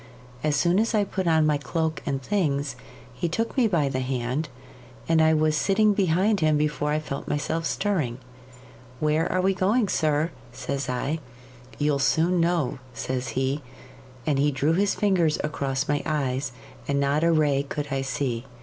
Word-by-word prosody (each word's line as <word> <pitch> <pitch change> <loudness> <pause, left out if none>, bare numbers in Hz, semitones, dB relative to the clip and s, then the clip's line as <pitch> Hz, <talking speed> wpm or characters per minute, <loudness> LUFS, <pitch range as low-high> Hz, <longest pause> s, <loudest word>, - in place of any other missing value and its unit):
As 150 -1 +2
soon 175 +5 +3
as 225 +1 +1
I 210 - +3
put 190 -2 -3
on 160 -1 +4
my 150 -1 +3
cloak 160 +1 -2
and 140 -2 0
things, 140 -8 0 0.4
he 125 +7 -2
took 225 +8 -2
me 250 -4 +4
by 165 -8 +1
the 130 -1 -1
hand, 130 +3 -2 0.6
and 165 -1 +4
I 160 0 +5
was 155 0 +2
sitting 205 +6 +3
behind 195 +2 +2
him 155 -2 +3
before 150 0 0
I 150 - +1
felt 150 -3 -5
myself 160 +3 -1
stirring. 160 - -1 0.8
"Where 155 +2 +1
are 185 - +1
we 190 +1 +2
going, 200 +4 +1
sir?" 155 0 +1 0.2
says 140 +3 -4
I. 135 +5 -1 0.6
"You'll 145 -1 +1
soon 160 +7 +2
know," 165 -6 +1 0.2
says 130 -1 -3
he; 135 +2 0 0.6
and 145 -3 +1
he 145 +1 +3
drew 145 +3 +1
his 195 +3 +2
fingers 180 -7 +2
across 140 -2 -2
my 145 0 +1
eyes, 140 -4 -1 0.4
and 140 0 +1
not 140 +2 +1
a 170 - +4
ray 150 -4 +3
could 145 +1 -5
I 135 0 0
see. 125 -2 -2
150 Hz, 175 wpm, -25 LUFS, 140-170 Hz, 0.8 s, I